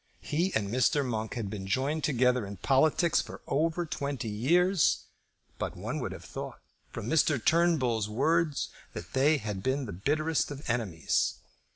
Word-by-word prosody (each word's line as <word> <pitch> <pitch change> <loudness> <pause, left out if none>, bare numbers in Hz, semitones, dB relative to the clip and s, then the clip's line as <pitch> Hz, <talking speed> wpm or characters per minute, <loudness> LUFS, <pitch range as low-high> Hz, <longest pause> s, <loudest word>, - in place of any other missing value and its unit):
He 170 +6 0
and 105 -2 +1
Mr. 130 +5 +2
Monk 110 -1 -3
had 115 -4 -3
been 95 -1 -6
joined 140 +9 0
together 125 -3 +2
in 100 0 -7
politics 155 - +3
for - - -9
over 165 +4 0
twenty 140 -6 -3
years; 170 - +3 0.6
but - - -3
one - - -3
would - - -3
have - - -9
thought, - - -7 0.3
from 105 - -6
Mr. 155 0 +3
Turnbull's 130 -8 +2
words, 155 +6 +1 0.2
that - - -8
they 145 +4 +4
had 105 -5 -4
been 130 +5 0
the 105 - -6
bitterest 155 - 0
of 145 0 -8
enemies. 110 -9 0
135 Hz, 160 wpm, -29 LUFS, 110-155 Hz, 0.6 s, they